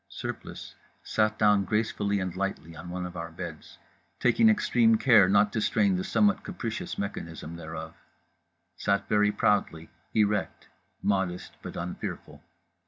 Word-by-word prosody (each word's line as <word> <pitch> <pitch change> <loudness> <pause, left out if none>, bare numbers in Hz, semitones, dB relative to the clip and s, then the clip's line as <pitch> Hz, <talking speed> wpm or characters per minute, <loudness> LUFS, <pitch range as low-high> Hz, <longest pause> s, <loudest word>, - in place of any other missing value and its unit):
Surplice - - -7 0.3
sat 110 0 +1
down 105 -2 +4
gracefully 105 0 0
and 90 -2 -3
lightly 95 -4 -4
on 85 +3 -9
one 90 0 -4
of 90 0 -8
our 85 -1 -5
beds, 85 -2 -9 0.4
taking 175 - +4
extreme 120 - +3
care 110 -7 +6
not 100 +1 +4
to 110 - 0
strain 200 - +2
the 185 - -1
somewhat 205 +2 +2
capricious 120 - -5
mechanism 85 -4 -5
thereof; 85 - -7 0.8
sat 100 -1 0
very 105 0 +3
proudly; 100 -6 0 0.2
erect; 105 -2 0 0.4
modest 95 -3 -1
but - - -8
unfearful. 90 +1 -6
100 Hz, 135 wpm, -28 LUFS, 90-110 Hz, 0.8 s, care